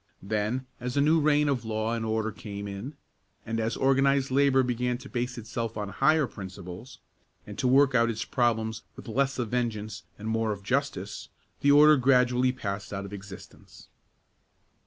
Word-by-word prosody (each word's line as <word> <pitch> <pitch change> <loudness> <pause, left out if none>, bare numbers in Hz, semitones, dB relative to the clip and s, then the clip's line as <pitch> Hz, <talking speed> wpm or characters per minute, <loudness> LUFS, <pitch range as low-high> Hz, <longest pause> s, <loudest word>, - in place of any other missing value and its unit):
Then, 110 +5 -1
as 125 +2 -4
a - - +5
new 155 +3 +4
reign 150 0 +3
of 135 -4 0
law 110 0 -2
and 115 -1 -2
order 110 0 -1
came 100 -1 -7
in, 100 +9 -6 0.5
and 115 0 -2
as 115 +1 -1
organized 135 0 +2
labor 135 -1 +4
began 125 0 -1
to 130 +2 -12
base 125 0 -3
itself 115 0 -4
on 105 -1 -3
higher 150 +8 +3
principles, 95 +1 -9 0.5
and - - -8
to 130 - +1
work 135 +1 +5
out 115 -1 +3
its 115 +1 -3
problem 110 -2 +1 0.2
with 130 - -11
less 135 +3 0
of 120 -4 -2
vengeance 110 -3 -2 0.2
and 110 - -7
more 110 0 0
of 100 -1 -6
justice, 125 -4 -2 0.3
the 145 - +2
order 150 +1 +7
gradually 125 -1 +3
passed 105 -5 -5
out 100 -1 -4
of 100 - -9
existence. 95 -1 -12
120 Hz, 175 wpm, -27 LUFS, 110-135 Hz, 0.5 s, order